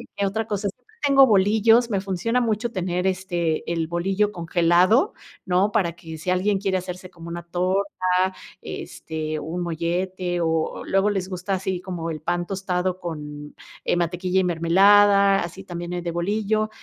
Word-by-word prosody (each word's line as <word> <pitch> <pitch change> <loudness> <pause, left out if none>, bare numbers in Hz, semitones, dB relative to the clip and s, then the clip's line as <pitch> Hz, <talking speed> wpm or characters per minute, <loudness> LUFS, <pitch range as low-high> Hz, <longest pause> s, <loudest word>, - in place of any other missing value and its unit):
¿qué 200 - 0
otra 220 +3 -2
cosa? 205 -1 -1
Siempre - - -15 0.2
tengo 275 -1 +7
bolillos, 220 +3 +4
me 195 -2 0
funciona 200 +6 0
mucho 230 +1 -1
tener, 180 -1 -2
este, 175 -4 -1
el 165 -1 0
bolillo 195 +5 0
congelado, 175 - +3 0.3
¿no?, 190 +3 +2
para 190 -6 +1
que 160 -2 -9
si 180 +4 -2
alguien 195 +2 +1
quiere 190 -1 0
hacerse 185 0 -7
como 170 -1 -12
una 170 0 -5
torta, 185 +3 0 0.8
este, 155 -1 -5
un 165 +4 -4
mollete 175 +2 -2
o 160 -1 -1
luego 195 +2 +2
les 190 -2 -2
gusta 185 +1 -3
así 185 -1 -2
como 175 -3 -5
el 155 -1 -5
pan 175 +1 -1
tostado 185 -1 -2
con, 150 -3 -7 0.3
eh, - - +1
mantequilla 180 +2 0
y 190 - +2
mermelada, 195 +3 +5
así 185 +3 -7
también 175 -1 -6
el 175 - -3
de 170 - -2
bolillo. 215 +5 0
185 Hz, 165 wpm, -23 LUFS, 170-200 Hz, 0.8 s, tengo